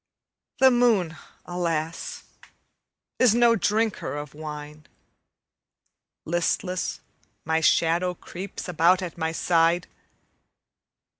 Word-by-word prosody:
The 265 0 +7
moon, 225 -9 +2 0.3
alas, 165 -2 -3 1.0
is 240 -4 +5
no 235 -1 +5
drinker 215 -3 0
of 145 -1 -7
wine; 150 0 -8 1.4
Listless, 175 +2 -1 0.4
my 160 +1 +1
shadow 170 +3 +2
creeps 185 +3 -8
about 180 +2 +3
at 175 - -6
my 160 -1 -2
side. 170 +1 +2
175 Hz, 85 wpm, -25 LUFS, 160-190 Hz, 1.4 s, The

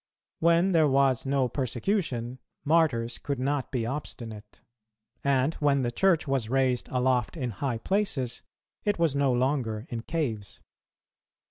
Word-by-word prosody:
When 170 +3 +4
there 160 -3 +4
was 135 -1 +2
no 135 -2 +2
persecution, 130 - -2 0.3
Martyrs 140 -7 +2
could 140 -1 -3
not 135 +1 -1
be 125 -5 -1
obstinate; 115 -5 -7 0.6
and 140 +2 +2
when 140 -2 +2
the 120 - 0
Church 170 +3 +2
was 135 -5 0
raised 130 -1 +1
aloft 125 +1 +1
in 125 -5 -2
high 120 +3 -2
places, 135 - -1 0.4
it 205 -1 +1
was 165 -4 +1
no 140 -2 +2
longer 125 -3 0
in 115 -1 -3
caves. 115 -9 -3
135 Hz, 135 wpm, -27 LUFS, 120-150 Hz, 0.6 s, When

